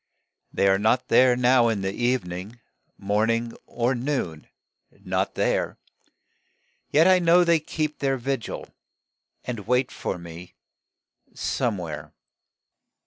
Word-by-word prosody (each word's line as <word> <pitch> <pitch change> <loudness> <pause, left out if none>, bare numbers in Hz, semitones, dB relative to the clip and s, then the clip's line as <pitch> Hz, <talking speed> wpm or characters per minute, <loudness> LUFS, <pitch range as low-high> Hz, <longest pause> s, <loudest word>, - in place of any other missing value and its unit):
They 100 - +2
are 95 0 +3
not 110 +4 +1
there 125 -1 +5
now 125 -1 +4
in 110 -4 0
the 95 0 -2
evening 115 -3 -2 0.4
Morning 115 +3 0
or 120 +2 0
noon 120 - -3 0.6
not - - -1
there; - - 0 1.1
Yet 160 +4 +4
I 185 -1 +6
know 175 +1 +5
that - - +3
they 170 -1 +4
keep 155 0 -3
their 135 -1 0
vigil, 130 -2 -4 0.8
And 110 -5 -6
wait 125 +1 +1
for - - -4
me 85 +1 -11 0.8
Somewhere. 85 - -3
120 Hz, 120 wpm, -24 LUFS, 100-135 Hz, 1.1 s, I